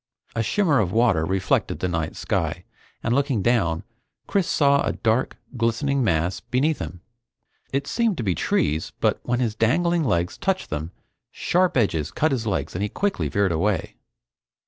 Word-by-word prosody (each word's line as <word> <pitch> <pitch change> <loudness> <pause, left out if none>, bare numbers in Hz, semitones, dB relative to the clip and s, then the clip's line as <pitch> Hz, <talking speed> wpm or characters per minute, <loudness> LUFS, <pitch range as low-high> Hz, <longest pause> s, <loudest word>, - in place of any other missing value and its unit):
A 115 - +1
shimmer 160 - +2
of 95 -5 +1
water 110 -8 +3
reflected 95 0 0
the 90 - -1
night 80 -3 -2
sky, - - -2 0.4
and 115 - +1
looking 135 -6 +1
down, 85 -9 +1 0.4
Chris 195 -4 0
saw 140 -1 +3
a - - 0
dark, 115 +3 0 0.2
glistening 125 +4 +1
mass 85 -3 +1
beneath 145 +5 0
him. 90 - -6 0.7
It 140 +1 -1
seemed 225 -2 0
to 120 - -2
be 95 -4 +1
trees, 75 0 0
but - - +2
when 120 0 -1
his 115 -4 0
dangling 165 +10 +2
legs 90 - 0
touched 190 -1 -1
them, 75 +2 -3 0.4
sharp 180 -3 +1
edges 90 - +1
cut 155 0 +1
his 120 -4 -1
legs 80 -8 -1
and 90 - -2
he 105 - 0
quickly 200 - -1
veered 100 -2 +1
away. 95 +2 -1
115 Hz, 170 wpm, -24 LUFS, 90-140 Hz, 0.7 s, water